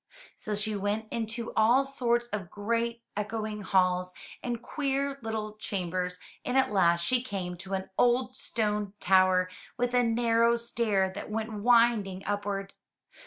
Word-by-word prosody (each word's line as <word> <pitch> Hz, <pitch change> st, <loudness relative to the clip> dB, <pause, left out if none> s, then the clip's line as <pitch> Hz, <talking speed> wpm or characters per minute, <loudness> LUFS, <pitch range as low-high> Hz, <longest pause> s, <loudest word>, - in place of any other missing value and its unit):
So 215 Hz, -, -4 dB
she 210 Hz, +1 st, -1 dB
went 205 Hz, +2 st, -1 dB
into 230 Hz, 0 st, -3 dB
all 235 Hz, +5 st, +5 dB
sorts 240 Hz, -3 st, +1 dB
of 200 Hz, -6 st, -4 dB
great, 230 Hz, +2 st, -2 dB
echoing 210 Hz, 0 st, -3 dB
halls 185 Hz, -2 st, +2 dB, 0.3 s
and 240 Hz, -1 st, -3 dB
queer 275 Hz, +1 st, -2 dB
little 215 Hz, -2 st, -4 dB
chambers, 180 Hz, -3 st, -3 dB, 0.3 s
and 250 Hz, -, 0 dB
at 265 Hz, -5 st, +3 dB
last 170 Hz, -4 st, +3 dB
she 250 Hz, +3 st, +2 dB
came 195 Hz, -7 st, -4 dB
to 190 Hz, +2 st, -4 dB
an 190 Hz, 0 st, -5 dB
old 245 Hz, +1 st, +3 dB
stone 210 Hz, -3 st, -1 dB
tower, 185 Hz, 0 st, +4 dB, 0.3 s
with 245 Hz, 0 st, 0 dB
a 250 Hz, -, +5 dB
narrow 230 Hz, 0 st, +3 dB
stair 225 Hz, -5 st, +1 dB
that 200 Hz, -, -7 dB
went 220 Hz, +1 st, -3 dB
winding 215 Hz, -3 st, +3 dB
upward. 200 Hz, -1 st, -2 dB
215 Hz, 145 wpm, -29 LUFS, 195-235 Hz, 0.3 s, all